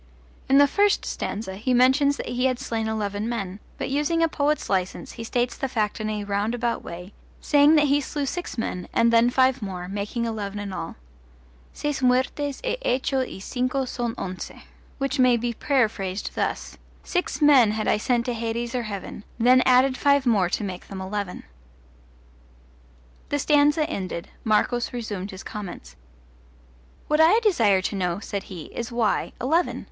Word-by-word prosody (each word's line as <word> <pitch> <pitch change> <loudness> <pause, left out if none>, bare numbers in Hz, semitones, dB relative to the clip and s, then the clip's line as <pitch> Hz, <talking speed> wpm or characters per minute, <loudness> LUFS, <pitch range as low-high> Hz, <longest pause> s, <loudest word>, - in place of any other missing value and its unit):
In 270 - +6
the 285 - +8
first 405 +8 +2
stanza 190 -2 -4
he 250 +4 0
mentions 265 +3 +4
that - - -5
he 250 +1 0
had 255 -1 +2
slain 230 -4 -3
eleven 210 0 -2
men, 200 -4 -4 0.2
but - - -4
using 300 +4 +1
a - - +4
poet's 300 -1 0
license 185 -2 -2
he 230 - -8
states 240 +1 -1
the 270 - -2
fact 215 -3 -1
in 215 - -2
a 210 -1 -3
roundabout 220 +4 -1
way, 180 +3 -9 0.3
saying 290 +1 +5
that 295 -1 +5
he 285 +1 +3
slew 285 +1 -3
six 350 0 -4
men, 180 -5 -3
and 230 0 +3
then 230 +1 +5
five 260 0 +3
more, 185 -3 -5
making 205 +4 -3
eleven 210 -3 -4
in 205 -2 -5
all: 165 - -5 0.8
Seis 295 -2 -3
muertes 260 +3 +1
e - - -1
hecho 265 - +1
y 250 - -8
cinco 255 +6 -1
son 240 -2 -3
once. 185 -1 -5 0.5
which 275 0 -2
may 250 -1 +5
be 235 +1 -2
paraphrased 215 -8 0
thus: - - -3 0.2
Six 360 0 -2
men 285 -7 +6
had 215 0 -2
I - - +3
sent 235 +2 0
to 245 - -1
hades 235 +1 -3
or 250 - 0
heaven, 200 0 -6
Then 250 +2 +5
added 255 +1 +4
five 280 -1 +3
more 205 -7 +3
to 210 - -1
make 185 -3 -6
them 195 - -7
eleven. 190 0 -4 1.9
The 290 - 0
stanza 295 +2 +3
ended, 185 - -5
Marcos 235 +3 +1
resumed 210 -5 -4
his 190 -1 -9
comments. 180 - -8 1.1
What 300 +1 +3
I 345 +8 +6
desire 225 - +3
to 200 - -2
know, 180 -3 -1
said 200 -1 -4
he, 175 -5 -8
is, 235 0 -4
why 235 -3 0
eleven? 320 +8 +1
235 Hz, 170 wpm, -24 LUFS, 205-270 Hz, 1.9 s, the